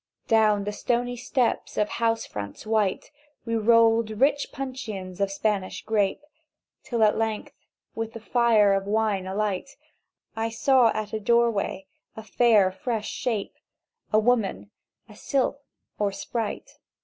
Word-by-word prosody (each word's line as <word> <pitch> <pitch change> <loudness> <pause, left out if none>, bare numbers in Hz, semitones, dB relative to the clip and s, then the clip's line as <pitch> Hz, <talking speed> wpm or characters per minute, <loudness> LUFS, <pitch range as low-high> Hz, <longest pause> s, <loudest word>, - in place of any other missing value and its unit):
"Down 215 -2 +3
the 205 - -3
stony 245 +3 -1
steps 245 0 -1
of 210 - +3
the - - -8
house 225 -1 0
fronts 100 - -7
white 215 -1 0 0.3
We 230 -1 -1
rolled 230 0 +4
rich 285 +2 +2
puncheons 220 -9 -6
of 200 - +2
Spanish 195 -1 -2
grape, 210 +4 0 0.6
Till 235 -3 -1
at 210 0 +3
length, 220 -1 -2 0.4
with 225 0 -4
the 230 - -7
fire 225 -3 +3
of 195 0 0
the - - -6
wine 210 -3 0
alight, 205 +5 -3 0.6
I 225 0 -1
saw 250 +2 +4
at 215 -1 -4
a 220 - -1
doorway 225 -3 +1 0.3
a 220 - -7
fair 215 -3 +3
fresh 220 +2 -3
shape— 220 -5 -3 0.6
A 215 - +4
woman, 215 - +1 0.4
a 210 - -15
sylph, 275 +4 -1 0.4
or 205 -1 +1
sprite. 220 +2 -5
220 Hz, 145 wpm, -25 LUFS, 205-235 Hz, 0.6 s, rolled